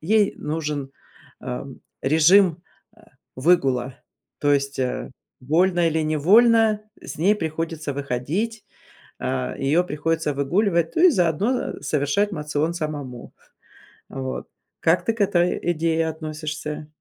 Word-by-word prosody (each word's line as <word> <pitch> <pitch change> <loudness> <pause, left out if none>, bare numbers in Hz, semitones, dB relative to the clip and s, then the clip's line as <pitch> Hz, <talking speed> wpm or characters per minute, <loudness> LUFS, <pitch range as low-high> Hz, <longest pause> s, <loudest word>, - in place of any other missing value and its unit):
ей 205 +4 +2
нужен, 150 -3 -4 0.5
ам, 60 0 -6 0.2
режим, 165 +4 +4 0.3
а, 220 - -22 0.3
выгула, 130 -4 +2 0.4
то 145 0 +2
есть, 140 0 0
а, 125 -1 -2 0.3
вольно 175 +6 +2
или 160 0 0
невольно, 215 +8 +4 0.2
э, - - -13
с - - -7
ней 195 +6 +4
приходится 160 -3 -3
выходить, 145 - -3 0.5
а, 65 0 -2
ее 155 +6 +2
приходится 160 -1 -1
выгуливать, 170 +4 +1
ну 340 - +4
и - - +7
заодно, 180 - +1 0.3
а, - - -19
совершать 150 +8 0
моцион 150 0 -2
самому. 145 -7 -5 0.8
А 135 - -7
вот. 130 0 -5 0.3
Как 170 +2 +2
ты 225 - +1
к 225 - -5
этой 180 -3 +2
идее 165 0 0
относишься? 155 -1 -5
160 Hz, 125 wpm, -23 LUFS, 145-180 Hz, 0.8 s, и